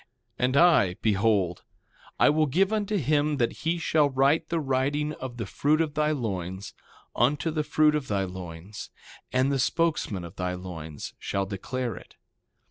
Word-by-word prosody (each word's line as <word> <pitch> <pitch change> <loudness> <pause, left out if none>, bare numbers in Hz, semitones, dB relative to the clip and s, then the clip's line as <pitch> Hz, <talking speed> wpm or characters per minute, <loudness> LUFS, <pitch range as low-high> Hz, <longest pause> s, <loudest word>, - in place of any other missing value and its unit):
And 130 +2 +2
I, 145 - +5
behold, 100 -4 +2 0.6
I - - +6
will 155 0 +2
give 190 +9 +2
unto 210 -1 0
him 150 -1 +1
that 120 -3 +1
he 165 +2 -2
shall 155 -3 +2
write 135 +3 +2
the 170 - 0
writing 145 +2 0
of 130 -4 -7
the 115 - -3
fruit 150 +10 +1
of 160 -3 0
thy 150 0 +1
loins, 100 - -3 0.4
unto 145 +7 +1
the 155 -1 -1
fruit 150 +1 +3
of 150 -3 -2
thy 100 -2 0
loins; 90 +1 -8 0.4
and 130 +2 +2
the 135 - 0
spokesman 145 - 0
of 85 - -10
thy 90 0 -2
loins 80 -5 -7
shall 100 0 -2
declare 115 +4 -4
it. - - -14
130 Hz, 165 wpm, -27 LUFS, 95-150 Hz, 0.6 s, I